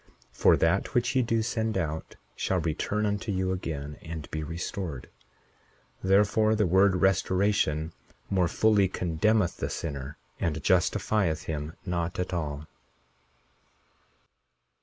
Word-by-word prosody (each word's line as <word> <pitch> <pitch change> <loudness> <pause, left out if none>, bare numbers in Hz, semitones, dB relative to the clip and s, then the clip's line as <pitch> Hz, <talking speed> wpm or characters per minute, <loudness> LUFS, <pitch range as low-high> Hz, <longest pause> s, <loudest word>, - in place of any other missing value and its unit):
41:15 - - -22
For - - +6
that 90 +9 +1
which 120 +2 +1
ye 130 - +5
do 115 -2 +1
send 110 -2 -1
out 80 -3 -3 0.2
shall 95 - 0
return 90 +6 -1
unto 105 +1 -1
you 95 -1 0
again, 75 -5 -4
and 80 -2 -7
be 80 - -3
restored; 80 -2 -5 1.0
therefore, 105 +3 +3
the 105 -1 +2
word 95 +2 +4
restoration 95 -4 +1 0.3
more 90 -3 +2
fully 105 +2 +3
condemneth 90 +3 +1
the - - -3
sinner, 70 -2 -5 0.2
and 80 -2 -1
justifieth 90 0 +1
him 75 0 -4
not 85 -2 -2
at 90 0 -2
all. 75 -3 -3
90 Hz, 125 wpm, -28 LUFS, 80-100 Hz, 1.0 s, For